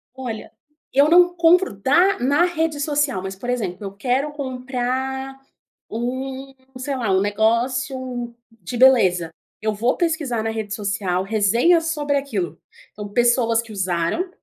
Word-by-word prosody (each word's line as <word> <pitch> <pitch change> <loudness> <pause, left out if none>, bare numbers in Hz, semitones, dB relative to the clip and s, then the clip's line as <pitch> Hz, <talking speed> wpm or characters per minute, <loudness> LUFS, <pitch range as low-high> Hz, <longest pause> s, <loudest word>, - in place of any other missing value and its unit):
Olha, 245 -5 -6 0.4
eu 280 +2 +5
não 350 +1 +6
compro 350 - +4
da 295 - +3
na 280 +7 +3
rede 325 -3 -1
social, 290 -7 0
mas 190 +1 -6
por 220 +6 -7
exemplo, 210 -6 -3
eu 195 - -6
quero 260 +7 -1
comprar 265 0 -3 0.5
um, 260 +3 -4 0.2
sei 270 +2 -3
lá, 230 -6 -1
um 190 0 +3
negócio 245 +4 -1 0.2
de 225 +1 -8
beleza. 190 -10 +4 0.3
Eu 215 0 0
vou 235 +5 0
pesquisar 310 -10 -1
na 225 - -1
rede 220 -2 -4
social 200 -3 -1
resenhas 235 - +3
sobre 295 -3 0
aquilo. 195 - -3 0.3
Então 210 0 -7
pessoas 235 +1 +2
que 230 -1 -13
usaram, 185 - -1
250 Hz, 140 wpm, -21 LUFS, 210-280 Hz, 0.5 s, não